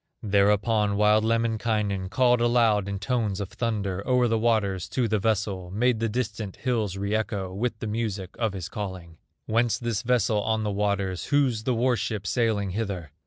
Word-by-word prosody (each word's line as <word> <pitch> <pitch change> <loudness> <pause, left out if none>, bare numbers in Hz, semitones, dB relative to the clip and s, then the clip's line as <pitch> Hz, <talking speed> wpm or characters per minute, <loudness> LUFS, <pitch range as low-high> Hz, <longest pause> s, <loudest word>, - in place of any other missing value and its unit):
Thereupon 105 +1 +2
wild 105 +1 +4
Lemminkainen 110 -4 0
Called 125 +1 +3
aloud 115 -4 +3
in 100 0 -3
tones 105 -2 -1
of 100 -2 -4
thunder 100 -5 -2
O'er 125 -1 +3
the 115 -1 +1
waters 105 -6 +1
to 125 -3 0
the 110 -1 +1
vessel; 100 -3 -1
Made 115 +4 +1
the 115 0 0
distant 110 -4 -3
hills 110 -7 -1
re 100 +1 -2
echo 100 -4 -2
With 110 +3 -2
the 110 - -6
music 105 -4 -3
of 110 -4 0
his 90 -4 -5
calling: 95 -6 -7 0.3
"Whence 115 +1 +1
this 115 -4 -2
vessel 115 -3 +1
on 110 +1 0
the 105 - -1
waters, 100 -2 -1
Whose 130 -6 +1
the 125 - +1
war 125 +2 +2
ship 110 -3 -3
sailing 105 -2 0
hither?" 95 -7 -4
110 Hz, 175 wpm, -26 LUFS, 100-115 Hz, 0.3 s, wild